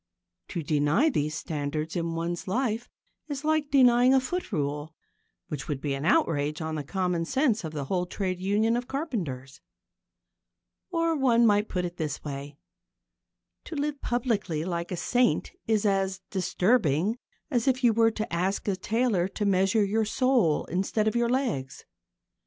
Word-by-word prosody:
To 170 - -4
deny 150 - +2
these 150 - -1
standards 155 0 -3
in 165 -1 -2
one's 170 +2 -3
life 235 +2 -1 0.4
is 290 -1 -5
like 310 -2 +1
denying 255 -1 +5
a - - +6
foot 355 +6 -4
rule 150 -1 -2 0.5
which 145 -3 -5
would 145 -3 -2
be 140 0 -2
an 135 +2 -3
outrage 150 -2 +2
on 160 -1 -3
the 155 -2 -3
common 180 +1 -1
sense 245 - +1
of 160 - -4
the 145 -3 -4
whole 180 +4 -1
trade 185 -1 -3
union 210 +4 +2
of 245 0 -2
carpenters. 170 - -4 1.3
Or 330 -2 +1
one 240 -4 +4
might 210 -1 +3
put 180 -1 -1
it 175 0 -6
this 155 -4 -3
way. 140 0 -6 1.1
To 330 - -7
live 290 0 -2
publicly 215 - -1
like 170 -1 -3
a 180 - -2
saint 245 +8 +1 0.2
is 220 -2 +2
as 195 -1 +1
disturbing 190 - +1 0.3
as 245 -1 +1
if 260 0 +2
you 235 -2 +5
were 225 +1 +4
to 215 -4 -5
ask 185 +5 -1
a 200 - +1
tailor 210 -2 +1
to 205 +2 -3
measure 195 +2 +3
your 215 +2 +1
soul 235 - +2
instead 195 +4 0
of 220 - 0
your 235 0 +2
legs. 240 - -2
195 Hz, 165 wpm, -27 LUFS, 160-240 Hz, 1.3 s, a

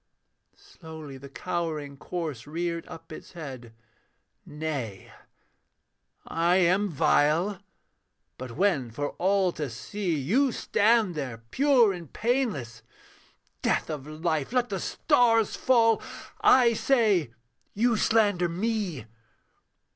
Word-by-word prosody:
Slowly 160 - -11
the 140 +1 -11
cowering 155 -2 -4
corse 150 -5 -5
reared 170 +2 -3
up 165 0 -11
its 155 - -10
head, 130 -8 -8 0.8
'Nay, 145 -10 -5 1.1
I 170 +2 +1
am 190 +3 +3
vile... 165 +5 +2 0.8
but 125 -2 -7
when 175 -11 +1
for 145 +6 -3
all 190 0 +2
to 150 -4 -4
see, 170 - -3
You 240 - +2
stand 220 -3 +2
there, 130 -7 -5
pure 260 -7 +4
and 170 -5 -9
painless 210 - -1 0.8
death - - 0
of 145 -2 -6
life! 155 0 -2
Let 250 -1 +1
the 195 -2 -3
stars 230 +3 +2
fall 230 -3 +3 0.4
I 245 -3 +6
say 215 - +2 0.5
you 235 +3 +2
slander 205 -5 +2
me! 190 - -2
175 Hz, 110 wpm, -27 LUFS, 145-215 Hz, 1.1 s, I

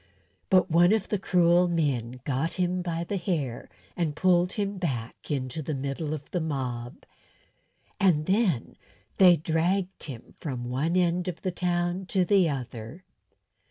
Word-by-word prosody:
But 185 -1 +4
one 175 +4 +5
of 220 -3 0
the 210 - 0
cruel 175 -1 +4
men 130 -8 -1
got 145 +4 -1
him 180 0 0
by 170 -1 -2
the 195 +3 -3
hair 155 - -3 0.3
and 160 -4 -1
pulled 180 0 +3
him 200 -2 -2
back 125 -10 -4
into 135 0 -2
the 155 0 -3
middle 140 +3 -3
of 145 -2 -11
the 180 - -1
mob; 125 -6 -4 0.9
and 165 -6 +3
then 190 - +1 0.4
they 180 -2 +8
dragged 180 +4 -1
him 125 -6 -9
from 130 -5 -4
one 135 +8 -1
end 180 0 +1
of 180 -2 -5
the 185 - 0
town 175 +1 -1
to 190 -2 +1
the 185 -2 +4
other. 125 +3 -6
170 Hz, 155 wpm, -27 LUFS, 140-180 Hz, 0.9 s, they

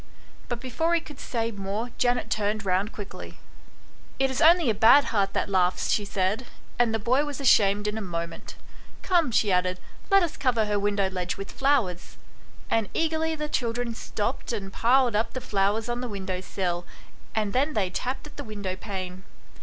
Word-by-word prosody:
But 240 -1 -2
before 320 +7 0
he - - +3
could 295 -4 -12
say 230 -1 -2
more 205 +4 -4
Janet 245 0 +1
turned 215 0 0
round 190 +3 +1
quickly. 205 -2 -9 0.4
" - - -27
It 270 0 +2
is 260 - -2
only 335 0 +6
a - - 0
bad 225 +7 +7
heart 195 -2 +1
that - - 0
laughs," 185 -2 +1
she 205 - +1
said; 200 +5 -1 0.3
and 240 -2 +4
the 225 - +1
boy 250 +6 +2
was 290 -1 -5
ashamed 205 -6 +4
in 210 +1 -2
a - - -5
moment. 170 -3 -5 0.2
" - - -23
Come," 345 -6 +3
she 215 -3 +2
added, 180 0 +1 0.2
" - - -25
let 390 -1 +6
us 330 -2 -3
cover 240 -5 +2
her 210 -1 0
window 200 -1 +1
ledge 180 -1 -3
with 195 0 -6
flowers." 255 -11 0 0.5
And 225 -3 0
eagerly 320 0 0
the 300 -1 -3
children 240 -3 -1
stopped 225 +2 -3
and 195 -4 -4
piled 245 -1 +3
up 220 +2 0
the 255 - -3
flowers 210 -1 0
on 240 0 -2
the 250 - -4
window 190 -3 -4
sill, 175 -2 -2 0.5
and 215 -2 0
then 285 +4 +1
they 190 -4 +1
tapped 255 +9 -3
at 300 - -13
the 285 - -5
window 205 -5 -4
pane. 185 -2 -6
220 Hz, 195 wpm, -26 LUFS, 195-255 Hz, 0.5 s, bad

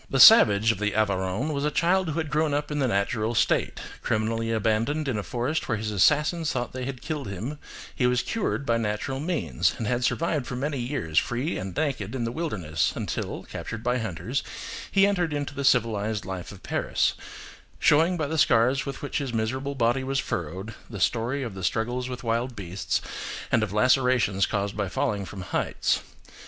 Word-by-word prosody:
The 135 - 0
savage 115 - +8
of 105 - -5
the 105 -1 0
Aveyron 100 +6 0
was 140 0 -2
a 150 - +2
child 175 +4 +2
who 155 - -3
had 160 -3 -2
grown 150 -1 +2
up 145 +1 -2
in 150 - -1
the 135 - +2
natural 110 +2 0
state: - - +1 0.2
criminally 115 +1 0
abandoned 115 +7 +1
in 130 - 0
a - - -1
forest 125 +9 -2
where 110 - +1
his 105 0 -3
assassins 150 - +3
thought 120 - -3
they 130 -1 -4
had 130 -2 -6
killed 150 -6 -3
him, 110 +10 -5 0.4
he 125 - +2
was 125 0 +2
cured 210 -10 -2
by 115 -3 +2
natural 115 +5 -2
means, 150 - 0
and 115 - -3
had 120 +3 0
survived 155 0 0
for - - -4
many 140 +2 -2
years 120 - 0
free 125 +7 -2
and 95 0 -6
naked 135 -8 -1
in 125 - -2
the 115 - -1
wilderness, 90 - -1
until, - - -3
captured 115 0 -6
by 125 +1 +1
hunters, 115 - -2 0.5
he 195 0 +5
entered 180 -6 +1
into 145 -1 -3
the 140 - -4
civilised 110 -5 +2
life 95 -2 -5
of 100 - -13
Paris, - - +1 0.6
showing 165 +4 +4
by 155 - 0
the 160 +2 -1
scars 130 0 +3
with 140 - -6
which 145 - -2
his 140 -3 -3
miserable 130 +5 -2
body 120 +1 +2
was 135 +1 -1
furrowed 95 - -3 0.2
the 105 -4 -6
story 120 +8 0
of 115 -5 -5
the 95 -1 -7
struggles 120 +6 -1
with 125 -1 -6
wild 120 +2 -1
beasts, 95 -2 -2 0.5
and 120 - +4
of 110 -3 -1
lacerations 125 -3 +3
caused 100 -1 -2
by - - -1
falling 100 -2 -1
from 95 0 -8
heights. 90 - 0
120 Hz, 195 wpm, -26 LUFS, 105-140 Hz, 0.6 s, savage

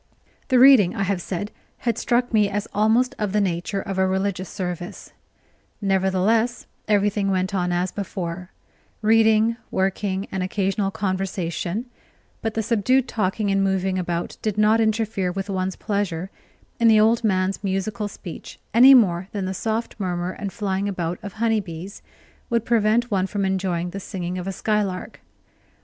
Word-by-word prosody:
The 255 - +3
reading, 250 -8 +7
I 200 - 0
have 195 -2 -1
said, 195 +4 -4 0.3
had 235 -3 -1
struck 240 +1 0
me 210 -2 +4
as 205 +1 -3
almost 225 +4 +3
of 210 -2 -1
the 210 - +3
nature 190 +1 -1
of 195 -1 -4
a 190 - +3
religious 190 0 -1
service; 180 0 -6 0.7
nevertheless, 195 +4 +1 0.2
everything 205 -1 +2
went 190 +1 0
on 180 -2 0
as 175 +1 0
before 185 -2 -5 0.5
reading, 220 +1 +4
working, 190 +1 -1
and 190 - -2
occasional 195 +1 0
conversation; 190 +1 -2 0.6
but 225 -1 -3
the 225 - 0
subdued 245 +4 +2
talking 205 -2 -1
and 195 0 +2
moving 190 -1 0
about 175 -1 -3
did 215 -2 -2
not 215 +2 +4
interfere 220 -4 0
with 195 +2 -4
one's 185 0 -2
pleasure 195 -3 -2 0.5
in 230 - +4
the 220 -1 +6
old 225 +2 +3
man's 190 -1 0
musical 205 +3 -2
speech 185 -4 -9 0.2
any 260 +4 +9
more 185 -6 +3
than 200 -2 -2
the 190 - -2
soft 220 +3 -3
murmur 180 -2 -2
and 200 +1 -5
flying 200 -2 -2
about 175 -2 -3
of 200 -2 -7
honey 225 0 +1
bees 185 +1 -8 0.5
would 235 -1 0
prevent 230 +1 +2
one 190 -1 +1
from 200 0 -2
enjoying 185 -2 -1
the 195 - -5
singing 185 -2 -5
of 180 - -6
a - - -1
skylark. 200 -1 -2
195 Hz, 160 wpm, -23 LUFS, 185-220 Hz, 0.7 s, any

